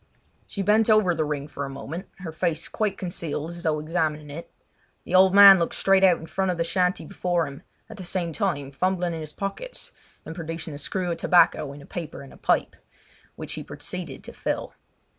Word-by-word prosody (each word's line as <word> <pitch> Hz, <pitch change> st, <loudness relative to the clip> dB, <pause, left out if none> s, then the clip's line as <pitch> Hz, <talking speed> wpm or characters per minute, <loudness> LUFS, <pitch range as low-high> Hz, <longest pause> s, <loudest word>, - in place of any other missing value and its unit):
She 200 Hz, -, -4 dB
bent 215 Hz, +3 st, +3 dB
over 215 Hz, -5 st, +5 dB
the 160 Hz, -1 st, 0 dB
ring 145 Hz, -1 st, -3 dB
for 140 Hz, -2 st, -6 dB
a 135 Hz, -, -4 dB
moment, 140 Hz, +7 st, -7 dB
her 170 Hz, -3 st, -5 dB
face 165 Hz, 0 st, -1 dB
quite 210 Hz, -3 st, -2 dB
concealed 165 Hz, -3 st, -3 dB
as 170 Hz, 0 st, -9 dB
though 160 Hz, -3 st, +1 dB
examining 155 Hz, -1 st, -2 dB
it. 165 Hz, +4 st, -8 dB, 0.5 s
The -, -, -7 dB
old 190 Hz, +1 st, +6 dB
man 200 Hz, -2 st, +10 dB
looked 170 Hz, -, -1 dB
straight 195 Hz, 0 st, +3 dB
out 185 Hz, -2 st, +7 dB
of -, -, -11 dB
the 165 Hz, -, -9 dB
front 190 Hz, +2 st, -1 dB
of 180 Hz, -, -1 dB
the 165 Hz, -, +1 dB
shanty 180 Hz, +2 st, 0 dB
before 175 Hz, -3 st, -1 dB
him, 140 Hz, 0 st, -9 dB, 0.3 s
at 220 Hz, -, -11 dB
the 190 Hz, -, -7 dB
same 175 Hz, -2 st, -2 dB
time 150 Hz, -10 st, -1 dB
fumbling 180 Hz, +3 st, 0 dB
in 165 Hz, -, -4 dB
his 155 Hz, -1 st, -6 dB
pockets -, -, -6 dB, 0.3 s
and 160 Hz, -, -6 dB
producing 165 Hz, -2 st, -6 dB
a 145 Hz, -, -7 dB
screw 180 Hz, +4 st, -2 dB
of 165 Hz, -, -2 dB
tobacco 155 Hz, -4 st, +3 dB
in 140 Hz, 0 st, -11 dB
a -, -, -13 dB
paper 165 Hz, -5 st, -7 dB
and 135 Hz, -, -13 dB
a -, -, -15 dB
pipe, -, -, +1 dB, 0.6 s
which -, -, -6 dB
he -, -, -5 dB
proceeded -, -, -7 dB
to -, -, -9 dB
fill. -, -, -3 dB
170 Hz, 215 wpm, -25 LUFS, 155-190 Hz, 0.6 s, man